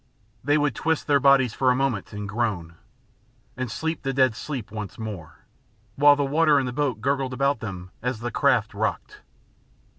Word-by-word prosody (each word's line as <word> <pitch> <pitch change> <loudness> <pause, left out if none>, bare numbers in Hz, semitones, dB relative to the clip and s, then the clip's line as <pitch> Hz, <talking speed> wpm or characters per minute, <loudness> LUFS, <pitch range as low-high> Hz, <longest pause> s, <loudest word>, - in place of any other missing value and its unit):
They 145 +3 +3
would 145 -1 +1
twist 160 -1 -1
their 145 -1 +3
bodies 135 -4 +4
for 130 - +2
a 125 - +4
moment 125 -7 -1
and 105 0 -6
groan, 100 -7 -2 0.8
and 130 -1 -4
sleep 160 +7 -3
the 135 -1 -2
dead 130 -4 +3
sleep 130 -4 -6
once 105 -2 -6
more, 100 -8 -8 0.5
while 145 +1 +6
the 145 -1 0
water 150 +1 +3
in 135 - -1
the 125 - -4
boat 130 -6 -1
gurgled 135 0 0
about 140 0 +1
them 95 -4 -7
as 125 -1 -2
the 120 0 -3
craft - - +2
rocked. - - -3
130 Hz, 180 wpm, -24 LUFS, 110-140 Hz, 0.8 s, while